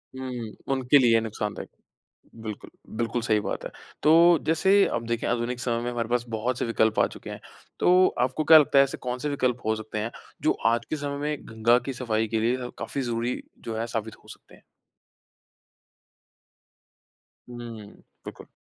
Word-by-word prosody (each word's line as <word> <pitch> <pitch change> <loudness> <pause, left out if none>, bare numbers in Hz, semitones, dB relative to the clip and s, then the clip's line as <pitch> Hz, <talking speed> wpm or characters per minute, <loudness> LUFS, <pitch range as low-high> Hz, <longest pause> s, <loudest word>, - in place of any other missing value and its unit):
हुँ। 125 -4 -5 0.2
उनके 130 +2 +4
लिए 115 -3 +5
नुक़सानदायक। 105 -2 -5 0.7
बिल्कुल, 110 -2 -8 0.3
बिल्कुल 120 0 -1
सही 110 -3 +2
बात - - -4
है। - - -5 0.3
तो 155 - +5 0.3
जैसे 165 +5 +3 0.2
आप 120 - -1
देखें 115 0 -2
आधुनिक 120 +1 -1
समय 120 -1 -1
में 120 - -2
हमारे 115 -2 -3
पास 120 0 0
बहुत-से 115 +3 -2
विकल्प 110 -1 +1
आ - - +5
चुके - - -10
हैं, - - -7 0.4
तो 185 +1 +5 0.2
आपको 150 +4 -3
क्या 160 0 +9
लगता 140 -2 +3
है, 135 - +8
ऐसे 135 - -5
कौन-से 125 +4 -2
विकल्प 125 -4 0
हो 110 - +2
सकते 110 0 -6
हैं, 110 +2 -2 0.3
जो - - +3 0.2
आज 115 0 -1
के 155 - -1
समय 140 -1 -4
में 150 0 -3
गंगा 115 +2 +3
की - - -1
सफ़ाई 115 -3 -1
के 110 - +2
लिए 120 +3 +1
ह 125 - -6
काफ़ी 140 - -3
ज़रूरी 120 0 -2 0.2
जो 115 -1 -4
है 115 - -2
साबित 115 -1 -4
हो - - -19
सकते - - -14
हैं? - - -20 2.9
हुँ, 115 -3 -8 0.4
बिल्कुल। - - -10
120 Hz, 175 wpm, -26 LUFS, 115-130 Hz, 2.9 s, क्या